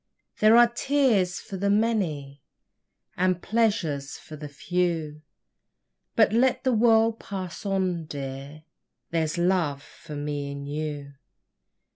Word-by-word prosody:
There 215 +2 +6
are 240 - +9
tears 240 -9 +2
for 195 - -7
the 200 +2 0
many 180 - 0 0.7
And 185 -1 +1
pleasures 180 -12 0
for 155 - -11
the 150 -1 -8
few; 160 -1 -2 0.9
But 220 -2 +4
let 250 +3 +2
the 260 -2 +2
world 225 0 +4
pass 190 0 -6
on, 185 -4 0
dear, 140 +1 -7 0.5
There's 160 -1 0
love 170 -5 +1
for 150 - -11
me 145 -1 -3
and 140 0 -7
you. 145 -1 -4
175 Hz, 120 wpm, -26 LUFS, 145-215 Hz, 0.9 s, are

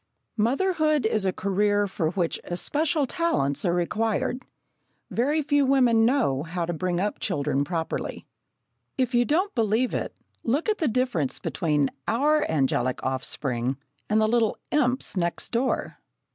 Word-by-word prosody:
Motherhood 305 - +2
is 215 -2 +1
a 190 - +2
career 205 +2 +1
for 170 -5 -1
which 175 -1 -1
especial 295 - 0
talents 265 - 0
are 175 - +2
required. 220 +7 -1 0.7
Very 295 +6 +1
few 290 0 +3
women 250 -4 +4
know 235 - +1
how 170 +2 -3
to 175 - -3
bring 175 +1 -1
up 205 +2 -1
children 145 -6 0
properly. 165 +2 -3 0.7
If 255 -1 0
you 240 0 +4
don't 360 +9 +1
believe 225 +2 +1
it, - - -3 0.3
look 285 - 0
at 425 - 0
the 315 - +1
difference 230 - 0
between 150 -6 0 0.2
our 295 +7 +3
angelic 130 -4 0
offspring, 130 -1 -2 0.3
and 215 +1 +3
the 215 - +3
little 225 -1 +2
imps 260 -6 +1
next 170 -2 -2
door! 245 +3 -1
220 Hz, 145 wpm, -25 LUFS, 170-265 Hz, 0.7 s, women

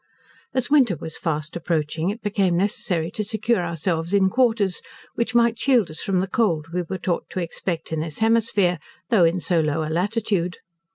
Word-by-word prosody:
As 255 +1 0
winter 260 -11 +5
was 160 +1 -7
fast 155 -1 -2
approaching, 160 0 -1
it 215 +3 -5
became 195 -4 +1
necessary 180 -3 -1
to 215 - -3
secure 220 -1 0
ourselves 170 +1 -1
in 190 -1 +3
quarters, 225 -6 +2 0.3
which 235 0 -2
might 235 -1 +3
shield 245 - +3
us 155 - -4
from 190 -2 +1
the 190 - -2
cold 170 -7 0
we 180 - 0
were 185 +2 -4
taught 180 -2 -2
to - - -4
expect 170 -1 -4
in 160 - -1
this 155 -1 -4
hemisphere, 220 -6 +2 0.3
though 195 -7 +6
in 170 +3 +2
so 175 -1 +1
low 155 0 0
a - - -4
latitude. 190 -1 0
185 Hz, 185 wpm, -23 LUFS, 165-220 Hz, 0.3 s, though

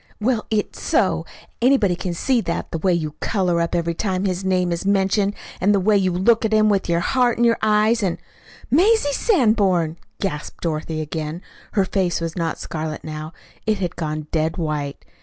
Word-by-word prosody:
"Well, 225 0 0
it's 215 -2 -2
so. - - +1 0.3
Anybody 235 -8 +4
can 175 0 -4
see 250 +6 +1
that 170 - -3
the 165 - -3
way 185 +3 +2
you 160 -3 0
color 180 -5 +1
up 170 - -1
every 170 -1 0
time 190 +1 -1
his 185 0 -1
name 185 -2 +1
is 170 - -2
mentioned, 200 +1 +1 0.3
and 205 +3 +4
the - - +3
way 210 +3 +3
you 190 -2 +2
look 205 +7 +3
at 220 - 0
him, 215 0 +4
with 195 -3 +1
your 170 0 +2
heart 245 +4 +2
in 240 - +2
your 230 -1 +3
eyes, 215 +2 +3
and 185 -4 0 0.3
" - - -22
"Mazie 355 - +4
Sanborn!" 205 - +2 0.2
gasped 165 -6 -4
Dorothy 155 -1 -2
again. 155 +3 -4 0.3
Her 195 -2 +2
face 185 -3 0
was 165 -1 -4
not 165 -2 -2
scarlet 155 -1 -5
now. 155 +1 -6 0.3
It 215 -1 +2
had 180 -3 -3
gone 155 -2 -3
dead 160 +1 0
white. 150 -4 -3
185 Hz, 195 wpm, -21 LUFS, 165-215 Hz, 0.3 s, Anybody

